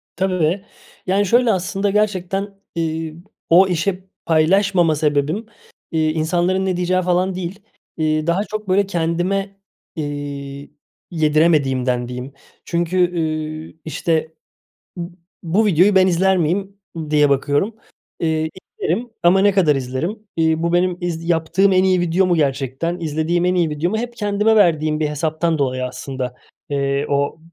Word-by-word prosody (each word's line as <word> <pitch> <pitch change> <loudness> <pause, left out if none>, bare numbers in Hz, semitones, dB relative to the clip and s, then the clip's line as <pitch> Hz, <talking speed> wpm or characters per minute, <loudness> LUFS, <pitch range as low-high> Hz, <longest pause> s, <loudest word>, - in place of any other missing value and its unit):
Tabii, 185 0 0 0.4
yani, 195 +2 +2
şöyle 240 +4 +4
aslında 195 +2 -1
gerçekten, 200 -1 -1 0.2
iii, 160 -1 -2 0.3
o 185 +3 +6
işe 185 +2 -1 0.2
paylaşmama 170 +1 +3
sebebim, 150 +7 0 0.5
iii, 155 -1 +1
insanların 175 +4 0
ne 185 -2 0
diyeceği 180 +1 +1
falan 180 +1 +1
değil. 185 +2 -5 0.4
İii, 155 0 0
daha 180 +4 +2
çok 215 -2 -6
böyle 200 +2 +3
kendime, 190 +3 -1 0.4
iii, 145 -1 -6 0.4
yediremediğimden 145 -6 +2
diyeyim. 125 +2 -7 0.3
Çünkü, 170 +1 -1 0.2
ııı, 155 -1 -3
işte 160 0 -1 0.6
b 175 - -4 0.4
bu 190 +6 +2
videoyu 195 +2 +4
ben 190 0 +6
izler 190 +2 +3
miyim 190 +4 -1 0.3
diye 150 -1 +4
bakıyorum, 145 +10 +1 0.4
iii, 160 -1 0 0.3
izlerim 225 +9 -1
ama 180 +3 +5
ne 205 +1 +4
kadar 170 -7 +3
izlerim? 135 - -3 0.2
İii, 160 0 +2
bu 170 0 0
benim 180 0 +1
iz 170 -1 -3
yaptığım 175 +4 +2
en 185 0 +4
iyi 185 -1 +3
video 175 +2 +2
mu 180 - +2
gerçekten, 140 +3 -1
izlediğim 165 +2 0
en 180 0 +2
iyi 170 -3 +1
video 150 +4 -1
mu? 220 - -1
Hep 240 0 -5
kendime 210 0 +2
verdiğim 155 -5 +3
bir 150 - +1
hesaptan 160 +2 -1
dolayı 130 -2 0
aslında, 125 -1 -5 0.4
eee, 140 0 0
o 140 +2 0
170 Hz, 140 wpm, -20 LUFS, 155-190 Hz, 0.6 s, o